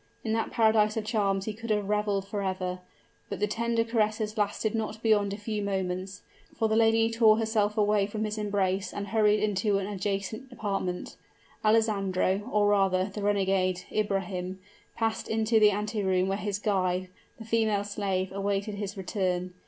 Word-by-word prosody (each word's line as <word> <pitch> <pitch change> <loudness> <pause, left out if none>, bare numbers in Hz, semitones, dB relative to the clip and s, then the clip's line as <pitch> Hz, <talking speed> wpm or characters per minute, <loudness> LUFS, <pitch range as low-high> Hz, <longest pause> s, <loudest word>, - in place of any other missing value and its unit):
In 220 - -1
that 225 0 0
paradise 220 -1 +3
of 215 - -2
charms 200 -3 0
he 215 - -3
could 225 +2 -8
have 210 -2 +1
reveled 205 -2 0
forever; 185 -3 -2 0.5
but - - -4
the 210 - +2
tender 230 +2 0
caresses 215 -1 0
lasted 210 0 0
not 220 0 -3
beyond 205 -3 +3
a 200 - -4
few 210 0 -3
moments, 190 -1 -3 0.3
for 225 - +2
the 220 - +1
lady 225 0 +4
tore 225 -2 +5
herself 220 -1 0
away 210 -1 +3
from 215 +1 -3
his 215 0 -3
embrace 195 -2 0
and 200 0 -5
hurried 215 -1 +3
into 205 0 +1
an 195 - -2
adjacent 205 +5 -3
apartment. 195 -6 -3 0.5
Alessandro 205 -2 +1
or 210 -1 +3
rather, 195 -1 +2
the 210 - -5
renegade, 190 -2 +1
Ibrahim 190 -3 -2 0.4
passed 225 -1 -1
into 220 0 +2
the 210 -1 +7
anteroom 200 -3 0
where 195 0 0
his 205 -1 -2
guide, 185 -3 0 0.3
the 225 - -10
female 220 -2 +1
slave, 195 -2 -2
awaited 200 +1 -2
his 200 0 -5
return. 185 -2 -2
205 Hz, 165 wpm, -28 LUFS, 195-220 Hz, 0.5 s, the